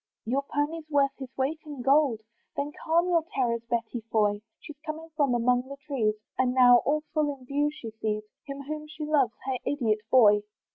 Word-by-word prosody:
Your 260 +5 +1
pony's 300 +3 -3
worth 280 -2 +3
his 265 -2 -6
weight 275 +4 0
in 290 -5 -7
gold, 270 -4 +3 0.3
Then 285 +1 -2
calm 340 +2 +3
your 335 -2 +3
terrors, 235 -3 +1
Betty 235 0 -2
Foy! 210 -2 +2 0.2
She's 290 -2 -11
coming 320 +1 -6
from 280 -5 +2
among 245 +1 +2
the 280 +1 -8
trees, 230 -8 0 0.2
And 255 -1 +2
now, 245 -1 +8
all 300 +5 +1
full 305 -2 +1
in 255 - -17
view, 290 +3 +1
she 235 -7 -8
sees 215 -1 -2 0.2
Him 275 0 -6
whom 305 +2 -5
she 305 0 -6
loves, 280 -6 +2
her 260 -2 -1
idiot 230 -7 0
boy. 210 -5 +6
275 Hz, 190 wpm, -27 LUFS, 240-300 Hz, 0.3 s, now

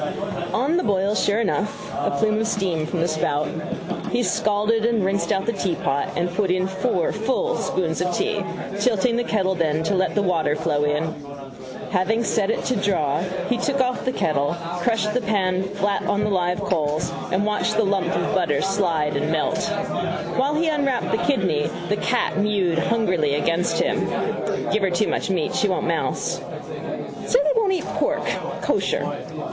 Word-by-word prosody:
On 285 +8 +1
the 360 - +1
boil 200 0 +1
sure 210 +1 +2
enough: 210 -1 -1
a - - 0
plume 215 +5 +2
of 220 - 0
steam 180 -8 0
from 170 0 -2
the 170 - +2
spout. 155 -2 0 0.6
He 245 - +1
scalded 215 +1 +1
and 230 -4 +2
rinsed 195 +1 0
out 195 0 +1
the 235 - 0
teapot 145 -8 -1
and 175 - +1
put 195 0 +1
in 185 +1 +2
four 190 -1 0
full 265 - 0
spoons 170 -3 -1
of 180 0 +1
tea, 440 - 0 0.4
tilting 235 -1 +2
the 240 - +1
kettle 195 -5 +1
then 160 -3 0
to 165 - 0
let 185 -1 +1
the 205 - +2
water 165 -5 +1
flow 150 -2 0
in. 150 +1 +1 0.9
Having 210 +5 +1
set 215 -3 +1
it - - 0
to 255 - +1
draw 155 -8 +1 0.3
he 245 - +1
took 280 +2 0
off 255 -1 +1
the 255 - 0
kettle, 150 - 0 0.2
crushed 210 +1 +1
the 250 - +1
pan 190 -4 +1
flat 200 0 0
on 205 +1 +1
the 210 - 0
live 180 0 +1
coals 155 -5 0 0.2
and 190 +3 +2
watched 215 +1 0
the 225 - +4
lump 195 -3 +1
of - - 0
butter 150 -7 +2
slide 165 -7 +1
and 150 +2 0
melt. 160 -1 0 0.7
While 275 +3 +1
he 325 +2 +1
unwrapped 280 -5 0
the 225 - +1
kidney 185 - +1 0.2
the 205 - +1
cat 235 -1 0
mewed 195 -5 +2
hungrily 180 -9 +1
against 165 +4 +1
him. - - +1 0.7
Give 215 - +2
her 195 - +2
too 180 +4 +1
much - - -1
meat 180 -5 0
she 210 - +2
won't 185 - 0
mouse. - - -1 0.9
Say - - +4
they - - +3
won't 425 -4 +3
eat 370 - -1
pork. - - -1 0.4
Kosher. - - -1
195 Hz, 180 wpm, -23 LUFS, 170-225 Hz, 0.9 s, the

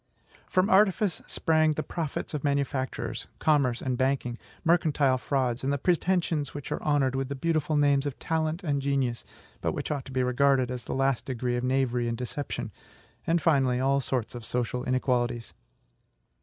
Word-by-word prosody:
From 185 +1 +2
artifice 195 -1 +3
sprang 155 -1 +2
the 155 - -3
profits 160 -3 -4
of 150 - -3
manufactures, 140 -2 -2
commerce, 140 -6 +2
and 130 -2 -1
banking, 130 -2 0 0.3
mercantile 155 -6 +3
frauds, 130 -2 -1
and 140 0 -1
pretensions 175 -5 +1
which 145 - -6
are - - -2
honored 145 -4 +2
with 135 0 -2
the 140 - -3
beautiful 155 +1 0
names 145 -1 +3
of 140 - -5
TALENT 160 +2 -1
and 145 -4 0
GENIUS, 135 -4 0 0.4
but - - 0
which - - -4
ought 140 -3 -2
to - - -9
be 130 0 +1
regarded 130 0 +2
as 125 -1 -5
the - - -3
last 135 -2 +1
degree 125 -1 -2
of 120 - -2
knavery 125 -2 +1
and 115 0 -2
deception; 125 -2 -4 0.6
and, 165 -2 +2
finally, 135 -5 +3
all 135 +1 +2
sorts 125 -4 -2
of 120 -2 -7
social 125 +2 -2
inequalities. 125 -2 0
135 Hz, 170 wpm, -28 LUFS, 125-150 Hz, 0.6 s, artifice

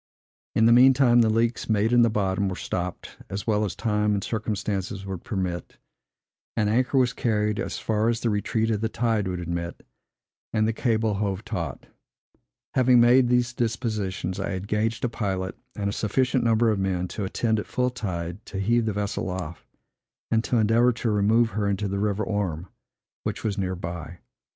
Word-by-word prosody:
In 110 - +4
the 115 - +6
mean 130 +2 +7
time, 120 -3 +5
the 110 - +3
leaks, 115 +2 0
made 110 +2 +2
in 120 - +6
the 115 - +5
bottom, 100 -2 0
were 95 - -4
stopped, 90 0 -5
as 100 0 -4
well 105 -2 +1
as 100 -4 -2
time 105 -2 +1
and 100 - -2
circumstances 105 -3 -3
would 95 -3 -6
permit; 95 -8 -4 0.8
an 105 -2 +2
anchor 125 +5 +2
was 125 -2 +3
carried 105 -3 0
as - - -3
far 110 +1 0
as 115 -1 -1
the 115 - +1
retreat 110 +2 0
of 105 -1 -1
the 110 - 0
tide 110 -4 0
would 90 -1 -3
admit, 85 0 -5 0.7
and 110 -1 +2
the 115 - 0
cable 110 -2 +1
hove 100 0 -2
taut. - - -4 0.9
Having 125 -1 +5
made 120 +2 +6
these 125 0 +2
dispositions, 110 -6 -2
I - - -2
engaged 105 +5 -1
a - - +2
pilot 95 -5 -3 0.2
and 100 -1 -2
a 100 - -1
sufficient 130 +4 +1
number 115 0 +3
of 105 - -1
men, 90 -2 -1
to 105 - -4
attend, 110 +3 0
at - - -6
full 125 0 0
tide, 90 -5 -5
to 100 - -5
heave 115 +3 +2
the 110 - 0
vessel 100 -1 -2
off, 90 -2 -6 0.6
and 115 0 +3
to 125 - +1
endeavor 115 +3 +4
to 115 -1 -1
remove 110 +3 +3
her 100 +1 -1
into 100 +1 -1
the 100 0 -2
river 105 0 0
Orme, 95 -6 -2 0.6
which - - -4
was 105 -3 -1
near 95 -2 -2
by. 85 0 -6
105 Hz, 190 wpm, -25 LUFS, 95-115 Hz, 0.9 s, mean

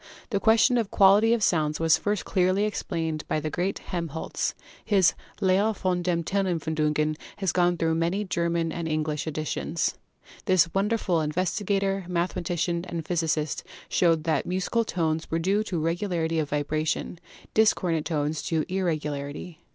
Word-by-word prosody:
The 200 - +1
question 230 +3 +4
of 225 - -1
the - - -13
quality 205 +3 +6
of 235 -2 +2
sounds 155 -5 +1
was 165 -1 +5
first 205 -1 -1
clearly 185 +1 +2
explained 165 -7 -2
by - - 0
the 155 0 -4
great 180 +4 -1
Helmholtz. 165 -4 -3 0.3
His 195 -5 +4 0.3
*Lehre 200 +3 +2
von 180 -2 0
den 170 -1 0
Tonempfindungen' 160 -5 0 0.2
has 195 -4 0
gone 175 -1 +2
through 165 -1 +1
many 170 +5 0
German 170 -3 -1
and 170 0 -4
English 155 -1 -1
editions. 155 +1 -2 0.5
This 170 -4 +3
wonderful 195 -4 +1
investigator, 195 +4 -1
mathema 180 +1 -1
tician 170 0 -1
and 165 -3 -4
physicist 160 -3 -1 0.3
showed 165 -3 +3
that 160 -1 0
musical 190 +6 0
tones 160 -6 -1
were 165 - 0
due 195 +6 +1
to 180 -6 -2
regularity 165 0 -1
of 150 -2 -1
vibration, 155 +3 -1 0.3
discordant 180 -7 +2
tones 150 -1 -1
to 160 -2 -1
irregularity. 155 -3 -3
170 Hz, 150 wpm, -26 LUFS, 160-190 Hz, 0.5 s, quality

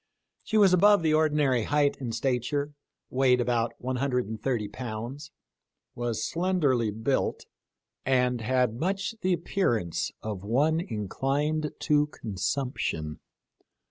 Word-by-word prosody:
She 220 - -1
was 195 -3 +6
above 200 0 +5
the 155 -1 +3
ordinary 150 -6 +2
height 145 -1 +2
in 125 -4 -4
stature, 135 +4 -1 0.4
weighed 130 -1 +3
about 120 -1 0
130 125 -3 -1
pounds, 125 +6 -6 0.6
was 115 -2 -2
slenderly 155 - +1
built, 110 +6 -1 0.6
and 125 -2 +2
had 125 0 +1
much 195 +6 -1
the 185 0 +2
appearance 110 - -1
of 105 -3 -4
one 145 +10 +2
inclined 145 - -1
to 150 -1 +3
consump 120 +2 -3
tion. 75 -1 -3
130 Hz, 110 wpm, -27 LUFS, 115-150 Hz, 0.6 s, was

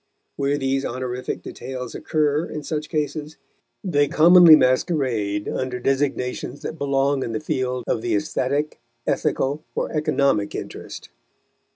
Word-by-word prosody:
Where 140 +1 0
these 135 0 0
honorific 125 0 -4
details 125 -2 -7
occur, 150 0 0
in 150 - -5
such 155 0 -4
cases, 155 0 -3 0.5
they 145 -7 +2
commonly 170 +1 +8
masquerade 125 - +1
under 130 -1 -3
designations 135 0 -1
that 160 - -5
belong 140 0 +1
in 115 - -3
the 110 - -1
field 125 0 -2
of 110 - -1
the - - 0
aesthetic, 140 +8 -1 0.3
ethical 145 +3 0
or - - -2
economic 140 -8 +1
interest. - - -8
140 Hz, 130 wpm, -23 LUFS, 125-150 Hz, 0.5 s, commonly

